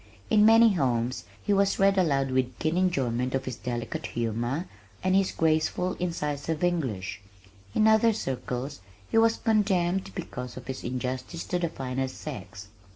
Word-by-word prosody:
In 210 0 +6
many 225 -1 +7
homes 125 -6 0 0.2
he 205 - +1
was 200 0 +3
read 195 0 +4
aloud 140 -8 +2
with 130 -1 0
keen 160 +1 0
enjoyment 130 -9 +1
of 135 0 -2
his 130 - -4
delicate 120 -2 -4
humor, 120 - -2 0.4
and 185 0 +3
his 195 -1 +3
graceful, 160 +3 +1
incisive 155 -2 -2
English; 130 - -1 0.5
in 215 - +4
other 220 +1 +5
circles 135 - -4 0.3
he 225 - +5
was 225 0 +4
condemned 195 -4 +1
because 125 -9 -6
of - - -8
his 130 0 -5
"injustice 130 +6 -3
to 180 - -2
the 170 -1 0
finer 130 -3 -3
sex." 105 -8 -8
150 Hz, 155 wpm, -27 LUFS, 125-185 Hz, 0.5 s, many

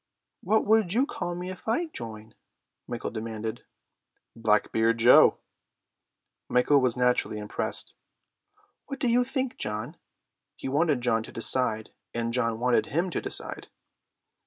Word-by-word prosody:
"What 220 - +2
would 215 -4 +3
you 250 +5 +3
call 175 -11 -4
me 180 +1 -5
if 185 - -12
I 275 +11 +1
join?" 110 -1 -8 0.5
Michael - - -4
demanded. 110 -1 -5 0.7
"Blackbeard 110 +1 +2
Joe." 120 +2 +7 1.1
Michael 135 +3 +4
was 125 -1 +1
naturally 125 -3 +1
impressed. 105 0 -2 0.9
"What 275 -1 -6
do 255 - 0
you 240 +1 +4
think, 260 0 -3
John?" 105 0 -4 0.6
He - - -7
wanted 145 -1 +1
John 115 -2 +2
to - - -10
decide, 115 -2 0 0.2
and 115 0 -2
John 115 -2 0
wanted 120 -2 +2
him 175 +5 -1
to - - -2
decide. - - -4
125 Hz, 135 wpm, -27 LUFS, 110-180 Hz, 1.1 s, Joe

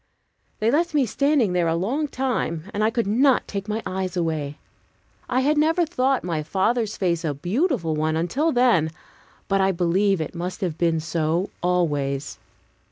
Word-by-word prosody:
They 220 +2 +1
left 330 +2 +1
me 280 -3 +4
standing 260 -2 +1
there 175 -2 +2
a 165 - +1
long 250 - -1
time, 250 - -2
and 210 - 0
I 215 - +4
could 230 0 -1
not 250 +6 +3
take 200 0 -5
my 215 +1 -2
eyes 185 0 -3
away. 155 -4 -2 0.7
I 255 +1 +2
had 295 +3 +2
never 325 +3 +3
thought 270 -5 0
my 165 -3 -2
father's 215 +7 0
face 170 -3 0
a 150 -3 -1
beautiful 185 - 0
one 155 +1 0
until 245 - 0
then, 240 - +3 0.6
but 195 0 +2
I 190 0 +3
believe 190 +2 +1
it 155 - -4
must 180 +3 -5
have 175 -5 -1
been 165 -2 +2
so, 165 +3 -1
always. 145 -6 -1
190 Hz, 170 wpm, -23 LUFS, 165-250 Hz, 0.7 s, me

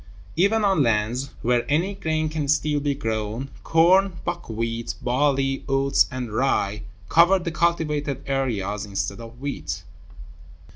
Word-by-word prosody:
Even 205 +5 +3
on 195 -6 +3
lands 115 +2 +1
where 120 0 +2
any 170 +7 +1
grain 155 -4 -1
can 155 -2 -3
still 150 0 +2
be 140 -1 -1
grown, 115 +1 -3
corn, 185 +4 +4
buckwheat, 115 -8 -3
barley, 135 +1 +1
oats, 135 0 +3
and 125 -5 -5
rye, 110 -4 0 0.3
cover 170 - +5
the 175 -2 -4
cultivated 150 -5 0
areas 105 -7 -1
instead 100 0 -3
of 115 +1 -11
wheat. 105 - -4
135 Hz, 130 wpm, -24 LUFS, 115-160 Hz, 0.3 s, cover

